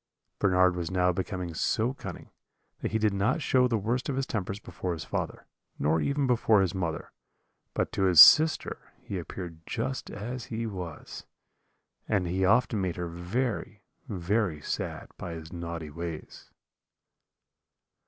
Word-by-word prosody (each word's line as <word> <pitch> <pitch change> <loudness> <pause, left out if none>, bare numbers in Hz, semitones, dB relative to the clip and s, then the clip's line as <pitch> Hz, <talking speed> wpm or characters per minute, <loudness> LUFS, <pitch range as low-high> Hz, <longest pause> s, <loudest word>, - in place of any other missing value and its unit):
"Bernard 90 -2 +4
was 85 -2 -3
now 90 -1 +2
become 90 -1 -4
so 115 +9 0
cunning - - -9 0.5
that - - -2
he 110 - 0
did 105 -2 +2
not 100 +11 +1
show 130 -4 +3
the 115 -2 +1
worst 120 +7 -1
of 135 - -1
his 135 0 0
tempers 100 -3 -3
before 90 -3 -4
his 80 -2 -5
father, - - -4 0.3
nor 75 +3 +2
even 140 - +1
before 115 -4 +4
his 95 -3 0
mother; 85 -4 -3 0.6
but - - 0
to 95 - +1
his 90 -4 +5
sister 155 - +7
he 95 - -4
appeared 85 -1 -7
just 130 +3 -3
as 120 +4 -5
he 115 -1 -4
was, 90 -7 -7 0.8
and 100 -4 +2
he 90 +2 -1
often 110 +1 +3
made 90 -2 -1
her 85 -1 -4
very, 100 +8 -3 0.3
very 95 -2 0
sad - - -4
by 85 -2 -5
his 80 +1 -9
naughty 85 -3 -5
ways. 85 0 -7
95 Hz, 155 wpm, -28 LUFS, 85-115 Hz, 0.8 s, sister